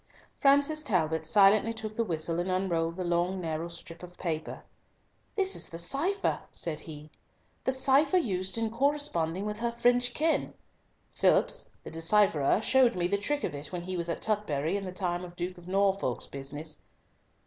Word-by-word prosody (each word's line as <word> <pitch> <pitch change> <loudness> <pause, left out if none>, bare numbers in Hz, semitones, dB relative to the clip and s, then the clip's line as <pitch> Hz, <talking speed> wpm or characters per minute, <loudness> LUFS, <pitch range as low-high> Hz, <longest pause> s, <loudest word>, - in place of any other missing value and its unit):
Francis 285 +2 +4
Talbot 160 - 0
silently 205 +6 +4
took 220 -1 -6
the 230 - +1
whistle 165 -3 -1
and 175 +2 -2
unrolled 170 -3 0
the 185 - -3
long 175 +2 0
narrow 165 -1 -3
strip 170 0 -9
of 180 0 -11
paper. 160 -3 -4 0.7
"This 390 -2 +2
is - - +1
the 165 - -7
cipher," 310 - 0
said 160 -3 -2
he, 150 -1 -10 0.5
"the - - +2
cipher 275 +5 +3
used 190 - 0
in 225 -1 -1
corresponding 230 - 0
with 210 +1 -3
her 235 0 -1
French 245 +1 +2
kin; 320 +1 0 0.6
Phillipps - - +2
the - - -8
decipherer 165 0 +3
showed 255 -1 +4
me 175 -1 0
the 200 +2 +1
trick 290 +8 -2
of - - -2
it 145 0 -5
when 175 -1 -4
he 185 +1 -4
was 170 -1 -2
at 170 - -2
Tutbury 185 -6 0
in 200 -1 -3
the 185 - -5
time 180 -1 -2
of 175 -1 -10
the 175 - -2
Duke 180 -1 -12
of 175 - -15
Norfolk's 195 -8 0
business. 145 +3 -6
185 Hz, 180 wpm, -29 LUFS, 165-235 Hz, 0.7 s, Francis